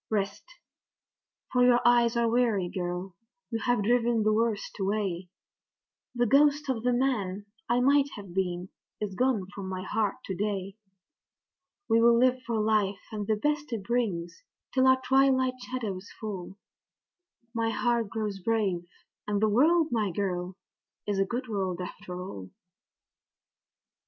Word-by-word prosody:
Rest, 200 -2 -1 1.1
for 250 -1 +4
your 245 -1 +6
eyes 240 -1 +4
are 235 0 +3
weary, 225 -6 +2
girl 180 +1 -4 0.4
you 225 - -1
have 245 -3 +1
driven 235 0 +2
the 215 0 +3
worst 220 -1 -1
away 190 -3 -1 0.9
The 240 0 +2
ghost 290 +4 +4
of 245 -4 0
the 250 +2 +1
man 215 -6 0 0.2
that 240 - +3
I 245 - +2
might 280 +2 +4
have 200 -4 -9
been 180 -1 -2 0.3
is 210 -2 -3
gone 240 -2 +1
from 195 -2 -6
my 185 0 -4
heart 210 -1 0
to 190 - -3
day; 195 -1 -2 1.1
We'll 230 +1 +5
live 255 +1 +3
for 230 -2 0
life 210 -2 +1
and 210 -2 -4
the 220 - +2
best 295 +5 -1
it 215 -4 -3
brings 195 -7 -2 0.3
till 260 0 +4
our 260 0 +5
twilight 260 -1 +3
shadows 210 -7 -5
fall; 195 -3 -6 1.0
My 230 -1 0
heart 235 -1 0
grows 210 -1 -3
brave, 190 -4 0 0.4
and 205 -1 0
the 215 +1 +3
world, 315 +9 +4
my 220 -4 +1
girl, 180 -1 -2 0.5
is 205 -2 -1
a 195 - +3
good 245 +5 -4
world 190 -5 -2
after 180 0 -7
all. 100 - -7
215 Hz, 145 wpm, -28 LUFS, 195-245 Hz, 1.1 s, your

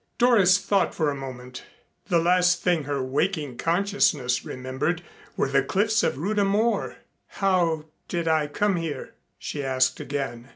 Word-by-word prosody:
Doris 210 -7 +5
thought 195 0 0
for 155 -3 +1
a - - -4
moment. 125 -2 -8 0.4
The 175 - +2
last 180 +1 +3
thing 170 -5 +1
her 140 -2 -2
waking 145 0 -1
consciousness 165 -8 +1
remembered 130 +7 -3 0.3
were - - +1
the 135 0 +2
cliffs 205 +9 +1
of - - 0
Rhuda 200 +7 0
Mor. 210 +4 0 0.3
"How 175 -5 0 0.2
did 170 -2 -2
I 155 -2 +2
come 195 +6 0
here?" 165 -3 -5 0.2
she 145 - -5
asked 130 -1 +1
again. 135 -3 -5
165 Hz, 150 wpm, -25 LUFS, 135-190 Hz, 0.4 s, Doris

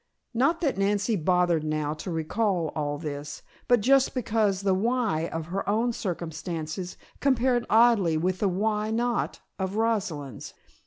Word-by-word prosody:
Not 275 +9 +2
that 280 - 0
Nancy 205 +3 +1
bothered 175 -2 +2
now 155 -1 -1
to 155 +4 -7
recall 170 +1 0
all 145 -1 -2
this, 145 -1 -6 0.2
but 245 -3 +4
just 270 +4 +3
because 215 -5 +1
the 195 -1 +2
"why" 215 -5 0
of 165 -1 -4
her 195 +1 -2
own 230 +3 +1
circumstances 170 -2 -4 0.2
compared 255 -3 +2
oddly 220 -8 +4
with 185 +3 0
the 200 - +2
"why 210 +3 0
not" 235 +2 -1 0.2
of 190 +1 -2
Rosalind's. 190 - -2
195 Hz, 145 wpm, -27 LUFS, 160-230 Hz, 0.2 s, but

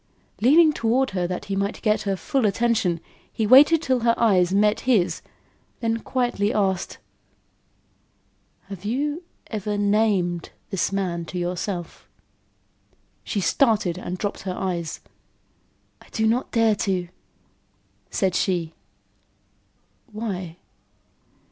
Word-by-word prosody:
Leaning 305 +6 +6
toward 250 +1 +1
her 180 -2 -1
that 180 0 -4
he 195 - -3
might 200 +2 -2
get 215 -2 +2
her 195 - +1
full 265 +3 0
attention, 205 -5 +1 0.3
he 220 - -1
waited 295 +8 +7
till 260 -4 +1
her 230 0 +2
eyes 185 -6 +3
met 210 +2 +3
his, 230 -9 +1 0.6
then 230 -1 -1
quietly 240 -5 -1
asked: 190 -4 -1 1.7
"Have 195 -2 -10
you 290 +9 -1 0.3
ever 210 -1 -2
named 200 -4 +1 0.2
this 195 -1 0
man 180 -4 -2
to 180 - -6
yourself?" 175 0 -4 1.1
She 205 - -2
started 205 -5 +2
and 180 0 -5
dropped 205 +2 -3
her 185 -2 -4
eyes. 175 -4 -3 1.0
"I - - -18
do 220 - -1
not 235 +4 +1
dare 225 -2 +3
to," 185 -3 -1 1.0
said 190 -2 0
she. 175 -3 0 1.4
"Why?" 190 -6 -5
205 Hz, 115 wpm, -23 LUFS, 180-230 Hz, 1.7 s, waited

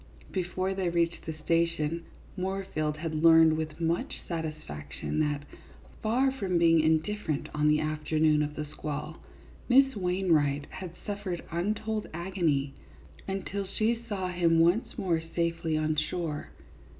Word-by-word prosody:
" - - -21
Before 185 +1 -1
they 190 -2 0
reached 170 -1 0
the 160 - -2
station, 165 0 0 0.3
Moorfield 185 -5 -2
had 160 0 -3
learned 160 -1 +7
with 155 0 -4
much 165 +1 -1
satisfaction 155 - -4
that, 145 -2 0 0.6
far 250 +5 +2
from 195 -9 -1
being 165 -1 +5
indifferent 160 +1 0
on 150 0 +2
the 150 0 +4
afternoon 155 0 +2
of 150 0 -2
the 150 - -3
squall, 150 +1 -5 0.5
Miss 270 +1 +6
Wainwright 170 -7 +2
had 180 -2 -7
suffered 200 -4 -3
untold 210 +5 -1
agony 165 -6 0 0.5
until 195 0 -3
she 225 +4 0
saw 190 -3 -2
him 170 -2 +3
once 175 +11 +2
more 175 -6 +1
safely 170 -2 0
on 155 0 +1
shore. 155 0 -2
165 Hz, 135 wpm, -29 LUFS, 155-190 Hz, 0.6 s, learned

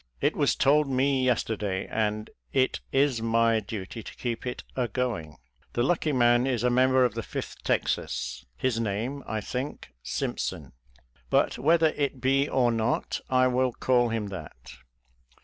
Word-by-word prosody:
It - - +1
was - - +2
told 145 +1 +3
me 135 0 +2
yesterday, 105 -6 0
and 105 -1 -2 0.2
it 130 -1 +1
is 135 -4 +2
my 115 0 +3
duty 105 +1 -6
to - - -10
keep 120 0 -4
it 125 - -4
agoing. 120 - -2 0.4
The 120 - +1
lucky 160 +1 +1
man 120 -1 +4
is 125 -4 0
a 125 - +3
member 130 +1 +4
of 120 - 0
the 115 - -3
Fifth - - -6
Texas 65 0 -1
— - - -37
^his 125 -3 +1
name, 115 +6 -2
I 110 -1 -2
think, 130 +7 -5
Simpson; 65 - -3 0.6
but - - +2
whether 160 +2 +4
it 140 -3 -2
be 135 +2 +2
or 125 -2 +3
not, 115 0 -1
I 130 0 +4
will 130 0 +2
call 120 -1 +2
him 110 -3 -2
that. 90 -6 -9
125 Hz, 160 wpm, -27 LUFS, 110-130 Hz, 0.6 s, man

